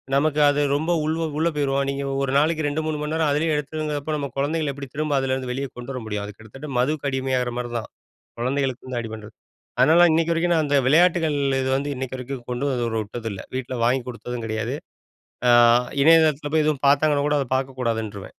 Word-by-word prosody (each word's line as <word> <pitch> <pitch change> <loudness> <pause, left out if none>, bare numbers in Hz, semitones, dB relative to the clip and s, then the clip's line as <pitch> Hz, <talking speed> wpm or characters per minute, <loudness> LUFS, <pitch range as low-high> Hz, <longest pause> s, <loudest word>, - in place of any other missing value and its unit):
நமக்கு 150 +1 +2
அது 145 +1 +1
ரொம்ப 160 +4 0
உள்வ 160 +1 -1 0.2
உள்ளே 165 +2 +2
போயிருவோம். 140 -1 0
நீங்க 140 0 -3 0.2
ஒரு 130 - -1
நாளைக்கு 155 +1 +2
2 150 +2 -1
3 155 -1 -2
மணி 150 +1 -3
நேரம் 160 -2 +1
அதுலயே 155 +2 +1
எடுத்துங்கிறப்போ, 150 0 -3
நம்ம 140 -1 -3
குழந்தைகளை 150 +1 0
எப்படி 140 0 -8
திரும்ப 150 -1 -1
அதுலேருந்து 130 -1 -2
வெளியே 135 +2 -3
கொண்டு 125 +2 -7
வர 130 - -5
முடியும். 105 -1 -3
அது 105 - -8
கிட்டத்தட்ட 135 +7 -10
மதுக்கு 140 +2 0
அடிமையாகற 130 -2 -1
மாதிரி 120 -1 -4
தான். 110 - -9 0.5
குழந்தைகளுக்குருந்து 130 -1 -2
அடி 115 - -7
பண்ணுறது. 110 0 -10 0.4
அதனால 160 +7 +6
இன்னைக்கு 165 +1 +2
வரைக்கும் 170 +1 +1
நான் 155 -2 +2
அந்த 145 - +1
விளையாட்டுகள் 165 -1 +3 0.2
இது 130 - -1
வந்து 140 +1 -3
இன்னைக்கு 130 0 -5
வரைக்கும் 125 -1 -7
கொண்டு 125 +3 -2 0.3
விட்டதில்லை. 110 -1 -6
வீட்டில 130 -1 -4
வாங்கிக் 125 +1 +1
கொடுத்ததும் 120 0 -6
கிடையாது. 110 0 -2 0.7
அ - - +7 0.5
இணையதளத்துல 155 -2 +4
போய் 155 - +3
எதுவும் 150 -2 0
பார்த்தாங்கன்னா 145 0 +3
கூட, 150 - +2
அதை 130 - -3
பார்க்க 130 0 -4
கூடாதுன்ருவேன். 110 -4 -3
140 Hz, 190 wpm, -23 LUFS, 125-155 Hz, 0.7 s, அ